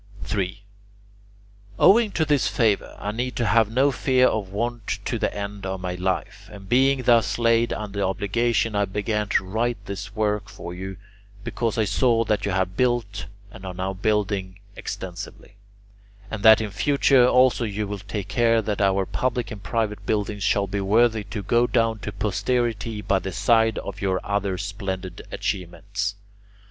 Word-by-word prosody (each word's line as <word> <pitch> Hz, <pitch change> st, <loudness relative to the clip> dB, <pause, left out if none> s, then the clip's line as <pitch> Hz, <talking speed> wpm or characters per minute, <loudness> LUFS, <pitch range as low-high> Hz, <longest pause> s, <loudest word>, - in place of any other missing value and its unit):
3. 100 Hz, 0 st, -3 dB, 1.1 s
Owing 215 Hz, +4 st, +6 dB
to 160 Hz, -, 0 dB
this 145 Hz, -3 st, +2 dB
favour 110 Hz, -4 st, +1 dB
I 105 Hz, -, -3 dB
need 125 Hz, +3 st, -3 dB
have 115 Hz, -1 st, +3 dB
no 135 Hz, +4 st, +3 dB
fear 130 Hz, 0 st, +3 dB
of 105 Hz, -6 st, 0 dB
want 115 Hz, +2 st, -3 dB, 0.2 s
to -, -, -2 dB
the -, -, 0 dB
end 100 Hz, 0 st, -6 dB
of 95 Hz, 0 st, -3 dB
my 90 Hz, -1 st, -3 dB
life, 90 Hz, +1 st, -3 dB
and 100 Hz, -2 st, -11 dB
being 130 Hz, +3 st, +3 dB
thus 115 Hz, -2 st, +3 dB
laid 115 Hz, 0 st, +3 dB
under 100 Hz, -1 st, -4 dB
obligation 105 Hz, +3 st, 0 dB
I 100 Hz, 0 st, +2 dB
began 105 Hz, +1 st, -2 dB
to 95 Hz, -, +2 dB
write 115 Hz, +5 st, -1 dB
this 100 Hz, +1 st, -6 dB
work 105 Hz, -2 st, -1 dB
for 90 Hz, -2 st, -8 dB
you, 95 Hz, +1 st, -6 dB, 0.5 s
because 115 Hz, +1 st, -2 dB
I 110 Hz, -, +2 dB
saw 115 Hz, +3 st, +2 dB
that 105 Hz, -1 st, 0 dB
you -, -, 0 dB
have 95 Hz, 0 st, -1 dB
built 110 Hz, -7 st, 0 dB, 0.2 s
and 95 Hz, -, -12 dB
are 95 Hz, -1 st, -6 dB
now 95 Hz, +1 st, -2 dB
building 95 Hz, -2 st, -1 dB, 0.2 s
extensively, 95 Hz, +3 st, -7 dB, 0.8 s
and 110 Hz, -, -4 dB
that 110 Hz, +1 st, +7 dB
in 105 Hz, -2 st, -4 dB
future 135 Hz, +2 st, +4 dB
also 125 Hz, -1 st, +4 dB
you 105 Hz, -1 st, -2 dB
will 100 Hz, 0 st, -5 dB
take 100 Hz, 0 st, -5 dB
care 115 Hz, -1 st, +3 dB
that 105 Hz, -1 st, -2 dB
our 95 Hz, -1 st, +2 dB
public 120 Hz, +5 st, -2 dB
and 105 Hz, -2 st, -7 dB
private 110 Hz, -2 st, -2 dB
buildings 105 Hz, -1 st, -1 dB
shall 100 Hz, -1 st, +2 dB
be 100 Hz, +1 st, -3 dB
worthy 110 Hz, +2 st, +3 dB
to 105 Hz, 0 st, -6 dB
go 120 Hz, +4 st, +3 dB
down 115 Hz, -2 st, +1 dB
to 105 Hz, -, -5 dB
posterity 105 Hz, +2 st, -1 dB
by 95 Hz, -, +2 dB
the 95 Hz, -, -5 dB
side 110 Hz, +4 st, +3 dB
of 100 Hz, +1 st, -6 dB
your 95 Hz, -2 st, +1 dB
other 100 Hz, -2 st, -1 dB
splendid 95 Hz, -3 st, -5 dB
achievements. 100 Hz, +3 st, -3 dB
105 Hz, 170 wpm, -24 LUFS, 95-115 Hz, 1.1 s, that